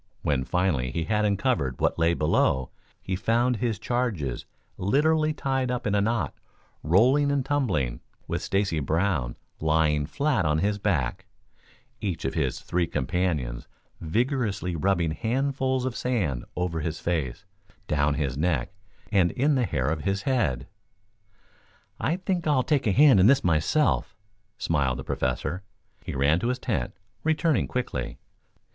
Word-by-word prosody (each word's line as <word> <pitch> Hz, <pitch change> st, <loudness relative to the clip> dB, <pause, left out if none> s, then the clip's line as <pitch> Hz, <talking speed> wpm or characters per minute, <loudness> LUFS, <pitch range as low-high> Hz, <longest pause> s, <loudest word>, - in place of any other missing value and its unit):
When 70 Hz, -3 st, +1 dB
finally 85 Hz, -9 st, 0 dB
he 85 Hz, +5 st, -2 dB
had 105 Hz, +4 st, +1 dB
uncovered 100 Hz, -, 0 dB
what -, -, +1 dB
lay 85 Hz, +1 st, +3 dB
below, 65 Hz, -4 st, +1 dB, 0.3 s
he 95 Hz, -, -2 dB
found 120 Hz, +5 st, +1 dB
his 115 Hz, -2 st, -1 dB
charges 105 Hz, -, -2 dB, 0.3 s
literally 155 Hz, -, +2 dB
tied 135 Hz, -3 st, -1 dB
up 125 Hz, 0 st, -2 dB
in 100 Hz, -, +1 dB
a 100 Hz, -, +3 dB
knot, 115 Hz, -1 st, 0 dB, 0.5 s
rolling 130 Hz, -, +4 dB
and 140 Hz, -2 st, 0 dB
tumbling, 95 Hz, -, 0 dB, 0.3 s
with -, -, -2 dB
Stacy 95 Hz, -5 st, 0 dB
Brown 75 Hz, -4 st, 0 dB, 0.2 s
lying 75 Hz, -2 st, +2 dB
flat 140 Hz, -9 st, +1 dB
on 75 Hz, -1 st, +1 dB
his 100 Hz, +5 st, 0 dB
back, 90 Hz, -12 st, -1 dB, 0.7 s
each 90 Hz, -9 st, -3 dB
of 65 Hz, -, -1 dB
his 70 Hz, -6 st, -1 dB
three 90 Hz, -1 st, 0 dB
companions 75 Hz, -5 st, -2 dB, 0.3 s
vigorously 105 Hz, -, -1 dB
rubbing 85 Hz, -1 st, +1 dB
handfuls 130 Hz, -, 0 dB
of 130 Hz, -2 st, -2 dB
sand 95 Hz, -, -1 dB
over 90 Hz, -2 st, -1 dB
his 80 Hz, 0 st, -3 dB
face, 80 Hz, 0 st, -2 dB, 0.4 s
down 75 Hz, -1 st, +1 dB
his 70 Hz, -4 st, -1 dB
neck 80 Hz, +1 st, 0 dB, 0.4 s
and 95 Hz, -4 st, +4 dB
in 145 Hz, -, +1 dB
the 130 Hz, -3 st, +2 dB
hair -, -, -1 dB
of 75 Hz, 0 st, -1 dB
his 100 Hz, +4 st, -1 dB
head. 70 Hz, -, 0 dB, 1.3 s
"I 155 Hz, -, +1 dB
think 185 Hz, -2 st, -2 dB
I'll 140 Hz, -4 st, +3 dB
take 145 Hz, -5 st, +1 dB
a -, -, +4 dB
hand 135 Hz, -1 st, +6 dB
in 95 Hz, -, +6 dB
this 135 Hz, +2 st, +5 dB
myself," 90 Hz, -, +1 dB, 0.4 s
smiled 70 Hz, -, 0 dB
the 65 Hz, -, -6 dB
Professor. 65 Hz, +11 st, -2 dB, 0.4 s
He -, -, -5 dB
ran 70 Hz, +5 st, +3 dB
to 115 Hz, -, -1 dB
his 125 Hz, +1 st, 0 dB
tent, -, -, -2 dB, 0.3 s
returning 160 Hz, -1 st, +2 dB
quickly. 125 Hz, 0 st, -3 dB
95 Hz, 150 wpm, -26 LUFS, 75-125 Hz, 1.3 s, hand